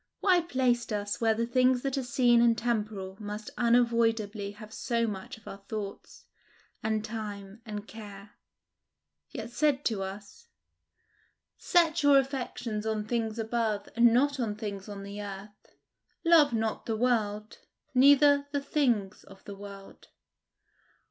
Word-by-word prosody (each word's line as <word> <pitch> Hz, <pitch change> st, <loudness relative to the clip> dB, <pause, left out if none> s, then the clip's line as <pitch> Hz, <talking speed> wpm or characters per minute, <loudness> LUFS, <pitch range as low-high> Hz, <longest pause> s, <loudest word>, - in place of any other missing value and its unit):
Why 370 Hz, -3 st, +4 dB
placed 255 Hz, -7 st, 0 dB
us 205 Hz, 0 st, -3 dB
where 225 Hz, -1 st, +3 dB
the 230 Hz, +1 st, 0 dB
things 255 Hz, +1 st, +2 dB
that 275 Hz, -1 st, -1 dB
are 270 Hz, -, 0 dB
seen 240 Hz, -1 st, +3 dB
and 235 Hz, -1 st, +4 dB
temporal 210 Hz, -5 st, -2 dB
must 210 Hz, 0 st, -6 dB
unavoidably 230 Hz, -4 st, +1 dB
have 215 Hz, +1 st, -12 dB
so 235 Hz, -1 st, 0 dB
much 195 Hz, -3 st, -6 dB
of 220 Hz, -, -19 dB
our 195 Hz, 0 st, -9 dB
thoughts, 205 Hz, -2 st, -7 dB, 0.6 s
and 220 Hz, 0 st, -1 dB
time, 210 Hz, -1 st, -7 dB
and 210 Hz, 0 st, -6 dB
care, 205 Hz, -2 st, -11 dB, 1.0 s
yet 230 Hz, -5 st, -7 dB
said 285 Hz, +2 st, +1 dB
to 215 Hz, -4 st, 0 dB
us, 200 Hz, -, -8 dB, 1.1 s
"Set 340 Hz, -2 st, +2 dB
your 285 Hz, -1 st, +6 dB
affections 255 Hz, -5 st, -2 dB
on 220 Hz, -1 st, -2 dB
things 225 Hz, -1 st, -1 dB
above, 220 Hz, -2 st, -1 dB
and 235 Hz, 0 st, +6 dB
not 280 Hz, +4 st, +2 dB
on 220 Hz, -4 st, -1 dB
things 205 Hz, -2 st, -6 dB
on 200 Hz, -1 st, -7 dB
the 200 Hz, +1 st, -7 dB
earth. 205 Hz, +1 st, -10 dB, 0.5 s
Love 325 Hz, -4 st, +6 dB
not 225 Hz, -1 st, -2 dB
the 225 Hz, -1 st, -1 dB
world, 215 Hz, -3 st, -1 dB, 0.3 s
neither 285 Hz, +2 st, +6 dB
the 285 Hz, -, 0 dB
things 240 Hz, -9 st, 0 dB
of 195 Hz, 0 st, -16 dB
the 200 Hz, -, -8 dB
world"? 200 Hz, 0 st, -12 dB
225 Hz, 140 wpm, -29 LUFS, 205-250 Hz, 1.1 s, your